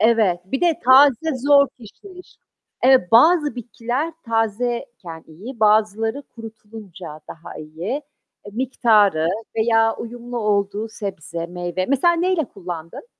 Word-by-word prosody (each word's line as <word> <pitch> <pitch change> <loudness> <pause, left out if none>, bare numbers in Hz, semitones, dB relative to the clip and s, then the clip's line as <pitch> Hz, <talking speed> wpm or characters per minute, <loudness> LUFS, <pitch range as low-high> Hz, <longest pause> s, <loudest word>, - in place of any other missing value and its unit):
Evet. 215 -5 +3
Bir 265 +9 -4
de 340 -3 +2
taze 270 +3 +5
zor 280 +1 +4
kişniş. 360 - -15 0.5
Eee, 255 -8 +5
bazı 300 +5 +5
bitkiler 245 +5 -4
tazeyken 225 -6 -3
iyi, 215 +10 -11
bazıları 220 +4 +2
kurutulunca 215 - -11
daha 165 +1 -10
iyi, 165 - -5 0.4
e, 205 - -10
miktarı 215 -9 +2 0.3
veya 225 0 +2
uyumlu 240 +1 -7
olduğu 210 0 -1
sebze, 170 -6 -6
meyve. 175 +1 -4
Mesela 280 +6 +3
neyle 345 -2 0
kullandın? 175 - -9
225 Hz, 115 wpm, -21 LUFS, 195-260 Hz, 0.5 s, taze